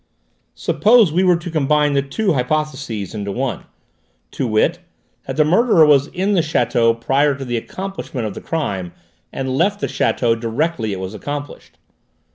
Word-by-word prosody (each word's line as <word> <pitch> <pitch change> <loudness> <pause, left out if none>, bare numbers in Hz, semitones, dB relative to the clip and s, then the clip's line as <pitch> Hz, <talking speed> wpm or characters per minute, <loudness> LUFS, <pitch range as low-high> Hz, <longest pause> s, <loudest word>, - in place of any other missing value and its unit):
"Suppose 220 -5 +4
we 180 +3 +2
were 180 -1 +4
to 170 0 -7
combine 150 -1 +2
the 140 - +2
two 185 +8 -1
hypotheses 135 - -2
into 100 -2 -4
one; 130 +3 -3 0.7
to 130 - -2
wit, 115 +11 +1 0.5
that - - -4
the 155 - +4
murderer 185 0 +4
was 145 -2 +4
in 190 +4 -1
the 180 - +3
château 120 -6 +1
prior 140 +4 +2
to 135 0 -7
the 120 -1 -3
accomplishment 165 -2 -5
of 105 - -4
the - - -8
crime 95 - -3 0.4
and 130 -1 -3
left 200 +7 +1
the - - -1
château 115 -2 0
directly 115 0 -1
it 95 - -4
was 95 +1 -5
accomplished. 145 +5 -7
140 Hz, 165 wpm, -19 LUFS, 115-165 Hz, 0.7 s, Suppose